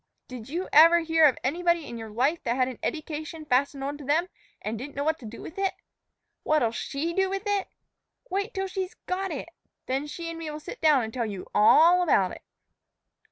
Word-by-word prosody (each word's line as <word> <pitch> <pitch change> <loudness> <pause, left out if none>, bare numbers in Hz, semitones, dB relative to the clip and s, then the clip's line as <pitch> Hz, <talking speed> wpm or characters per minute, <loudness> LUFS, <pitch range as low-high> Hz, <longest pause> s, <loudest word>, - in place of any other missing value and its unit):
Did 250 -2 -9
you 350 +5 -3
ever 335 +3 +8
hear 325 -1 +4
of 265 - +1
anybody 340 +3 +1
in 235 - -7
your 225 -1 -7
life 265 +10 0
that 240 -3 -1
had 255 -1 +2
an 255 -3 -7
eddication 310 0 -4
fastened 275 +1 +1
on 285 +1 -4
to 285 -1 -9
'em 335 +5 +2 0.3
an' 215 - -3
didn't 270 +5 -8
know 280 - -1
what 315 +1 0
t' 230 - -9
do 230 - -9
with 320 - -8
it? 390 -1 0 0.7
What'll 300 -7 +2
she 285 +7 -3
do 385 +1 +1
with 390 +1 -3
it? 405 -2 0 0.6
Wait 400 0 -2
till 385 0 -2
she's 375 -1 -4
got 380 +1 -2
it. 315 0 -5 0.4
Then 270 +3 -2
she 335 +3 -6
an' 330 - -7
me'll 305 -2 -5
sit - - -9
down 300 -5 +5
an' 220 - -5
tell 235 -1 -2
you 195 -3 -6
a - - +2
a - - +5
all 335 +11 +7
about 200 - +3
it." - - -10
305 Hz, 220 wpm, -27 LUFS, 255-340 Hz, 0.7 s, ever